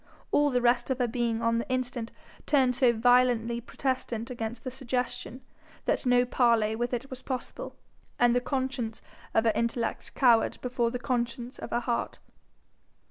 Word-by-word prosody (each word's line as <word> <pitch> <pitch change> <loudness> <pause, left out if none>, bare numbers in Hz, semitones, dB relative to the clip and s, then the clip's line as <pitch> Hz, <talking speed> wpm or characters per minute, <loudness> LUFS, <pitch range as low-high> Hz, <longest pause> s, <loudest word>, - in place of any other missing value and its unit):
All 290 0 +4
the 250 -2 0
rest 240 +1 +3
of 260 - 0
her 250 -2 +1
being 235 -1 -1
on 230 0 +2
the 235 - -5
instant 250 -2 -2 0.4
turned 260 -4 +3
so 245 -1 +4
violently 235 0 +3
protestant 245 -1 -3
against 230 -1 -5
the 255 - -4
suggestion, 250 0 -3 0.4
that - - 0
no 245 0 +5
parley 230 -3 +2
with 240 +2 -2
it 250 +2 -4
was 260 0 -7
possible, 255 -2 -5 0.4
and 240 -1 +4
the 245 - +2
conscience 260 -4 -3 0.3
of 225 - +4
her 225 - +4
intellect 235 +1 -2
cowered 235 -4 +4
before 245 -2 0
the 250 - -3
conscience 240 0 -3
of - - -6
her 240 - 0
heart. 240 -1 -2
245 Hz, 165 wpm, -28 LUFS, 235-255 Hz, 0.4 s, no